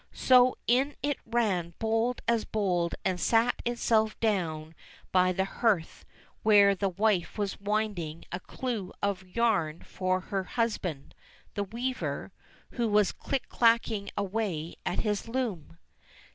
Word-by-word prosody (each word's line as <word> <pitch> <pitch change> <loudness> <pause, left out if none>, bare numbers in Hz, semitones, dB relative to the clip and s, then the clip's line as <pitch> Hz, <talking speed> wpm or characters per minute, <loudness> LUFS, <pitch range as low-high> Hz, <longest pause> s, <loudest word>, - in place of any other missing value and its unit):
So 255 -1 +5
in 265 +5 +2
it 290 -1 0
ran 195 -8 0
bold 225 +2 0
as 230 -2 +2
bold 180 -5 0
and 185 -1 0
sate 230 +4 +3
itself 225 -2 +1
down 165 -8 -1 0.4
by 185 0 +4
the 190 +1 0
hearth 195 -5 0 0.4
where 205 -2 +6
the 195 0 -1
wife 195 0 0
was 205 -2 -2
winding 200 -6 -2
a 180 - -3
clue 215 -2 -4
of 200 -2 0
yarn 185 -5 0
for 185 0 -1
her 190 +1 -3
husband, 185 - -2 0.4
the 205 -1 -2
weaver, 245 +6 -3 0.4
who 235 -2 -1
was 210 -2 +3
click 275 -2 -3
clacking 230 -3 +2
away 195 -5 -2
at 175 - 0
his 210 0 -1
loom. 225 - -3
205 Hz, 130 wpm, -29 LUFS, 185-230 Hz, 0.4 s, where